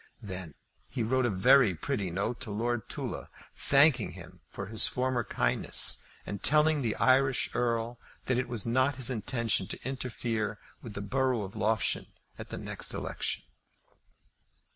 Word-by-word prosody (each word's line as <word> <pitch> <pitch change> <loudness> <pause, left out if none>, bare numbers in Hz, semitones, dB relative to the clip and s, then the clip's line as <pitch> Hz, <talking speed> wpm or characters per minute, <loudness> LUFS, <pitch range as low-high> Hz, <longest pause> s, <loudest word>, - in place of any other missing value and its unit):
Then 90 -6 -6 0.3
he 120 -3 -2
wrote 130 +2 +2
a - - 0
very 100 +2 +5
pretty 100 - -2
note 100 +7 -2
to 125 - -7
Lord 115 +2 -2
Tulla, - - -5 0.2
thanking 140 -4 +3
him - - -12
for 100 - -6
his 110 +2 +4
former 125 -1 0
kindness, - - +2 0.2
and 100 - -5
telling 150 0 +4
the 115 -4 -1
Irish 135 0 +3
Earl 115 0 -1 0.3
that 125 -1 +1
it 125 - -1
was 120 -4 0
not 130 +4 +2
his 130 -1 +2
intention 115 -4 0
to - - -6
interfere 115 -5 -3 0.2
with 110 -3 -9
the 100 - -4
borough 130 +1 0
of 95 0 -8
Loughshane 110 -3 0 0.3
at - - -8
the - - -5
next - - -2
election. - - -2
120 Hz, 155 wpm, -30 LUFS, 105-130 Hz, 0.3 s, very